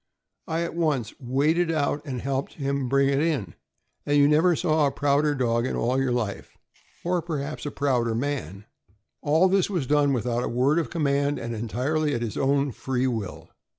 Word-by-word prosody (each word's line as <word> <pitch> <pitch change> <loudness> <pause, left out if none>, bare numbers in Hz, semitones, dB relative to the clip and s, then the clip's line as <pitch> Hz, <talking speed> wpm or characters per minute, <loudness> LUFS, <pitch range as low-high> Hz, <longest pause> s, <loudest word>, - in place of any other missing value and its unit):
I 165 +1 -1
at 170 - -4
once 150 -9 0
waded 150 +7 +1
out 150 -2 0
and 130 -4 -4
helped 135 +1 -2
him 140 -3 -2
bring 140 +1 +3
it 140 0 +2
in, 140 - -1 0.5
and 145 0 +1
you 145 0 +6
never 160 +4 +4
saw 155 -3 +2
a - - -1
prouder 145 +1 +1
dog 120 -2 +1
in - - -2
all 130 +3 +1
your 130 -2 0
life, 115 -5 -3 0.5
or 175 0 0
perhaps 155 -3 -4
a - - -3
prouder 125 -5 0
man. 115 - -3 0.6
All 160 +5 +4
this 190 0 +2
was 175 -9 -1
done 145 +1 +3
without 120 -1 0
a - - -2
word 135 +7 +2
of 165 - -2
command 145 -3 0
and 115 0 -4
entirely 130 +7 -1
at 120 - -2
his 115 - -4
own 140 0 +1
free 130 +1 -2
will. 110 -7 -4
140 Hz, 185 wpm, -25 LUFS, 125-150 Hz, 0.6 s, you